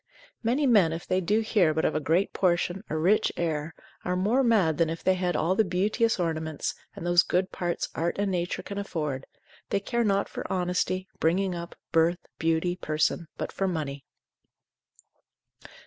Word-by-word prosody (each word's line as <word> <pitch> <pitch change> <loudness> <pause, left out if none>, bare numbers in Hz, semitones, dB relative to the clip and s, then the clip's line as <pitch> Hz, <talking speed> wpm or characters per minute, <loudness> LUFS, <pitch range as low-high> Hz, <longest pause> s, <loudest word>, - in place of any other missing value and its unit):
Many 250 +6 +1
men 200 -10 +5
if 165 - -6
they 185 0 +1
do 210 +5 +2
hear 190 -8 +2
but 160 - +1
of - - +2
a 155 - +1
great 165 +7 +1
portion, 180 +1 +1
a 155 - -1
rich 185 +7 +3
heir, 160 -1 -2 0.3
are 180 - -1
more 210 +8 +2
mad 195 - +3
than 165 -1 +3
if 165 0 -5
they 190 - +4
had 180 -1 -1
all 165 +4 +2
the 220 - +3
beauteous 210 +4 +1
ornaments, 160 -3 -2 0.2
and - - -7
those 175 0 +5
good 185 +2 0
parts 175 -1 -2
art 170 +1 -1
and 200 -1 0
nature 175 -1 -2
can 200 0 -5
afford, 150 -9 -3 0.4
they - - +1
care 235 +4 -1
not 200 -2 +1
for - - -6
honesty, 185 +1 0
bringing 185 +3 +1
up, 170 0 -6 0.2
birth, 165 +2 +3 0.2
beauty, 165 +2 +1
person, 155 +1 0
but - - -4
for 195 - -1
money. 145 -6 -3
180 Hz, 180 wpm, -27 LUFS, 160-195 Hz, 0.4 s, men